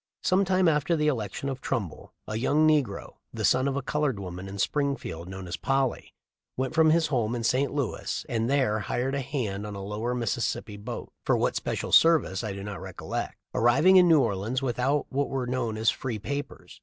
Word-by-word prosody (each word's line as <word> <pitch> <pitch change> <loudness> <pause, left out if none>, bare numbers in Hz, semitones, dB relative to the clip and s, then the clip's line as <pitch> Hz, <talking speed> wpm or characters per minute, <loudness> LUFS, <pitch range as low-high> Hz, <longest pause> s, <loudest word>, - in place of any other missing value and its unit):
Some 190 +2 +3
time 185 -1 +3
after 155 +1 +2
the 150 -1 0
election 115 -1 -3
of 135 -1 -4
Trumbull 100 - -4 0.2
a 110 - -4
young 145 +7 +3
negro, 145 -10 0
the - - -2
son 130 +2 +3
of 135 - -1
a 140 - -2
colored 145 -6 -1
woman 90 0 -6
in 100 +1 -7
Spring 140 +6 +1
field 85 -7 -7
known 95 -1 -7
as 85 -1 -4
Polly, 135 +7 -1 0.4
went 130 0 -1
from 160 -1 +5
his 165 +1 +4
home 115 -2 +1
to 120 -1 -3
St. 130 +4 +1
Louis 140 -6 -3
and 115 0 -1
there 130 -6 +2
hired 125 +5 -2
as 140 - 0
a - - -2
hand 120 -8 -3
on 105 - -6
a 100 - -6
lower 110 +5 -3
Missis 120 0 0
sippi 105 0 -8
boat, - - -6
— - - -53
for - - +2
what - - 0
special - - -3
service, 155 -12 +4
I 110 - -3
do 100 0 -6
not 100 -1 -6
recol - - -9
lect, - - -3
— - - -59
arriving 135 +11 +5
in 180 -1 +7
New 160 -4 +6
Orleans 105 +4 -1
without 130 +3 0
what 140 +1 -1
were 130 -2 -2
known 120 -3 -2
as 110 +1 +3
free 125 -4 -4
papers. 140 +7 -6
125 Hz, 225 wpm, -27 LUFS, 105-140 Hz, 0.4 s, in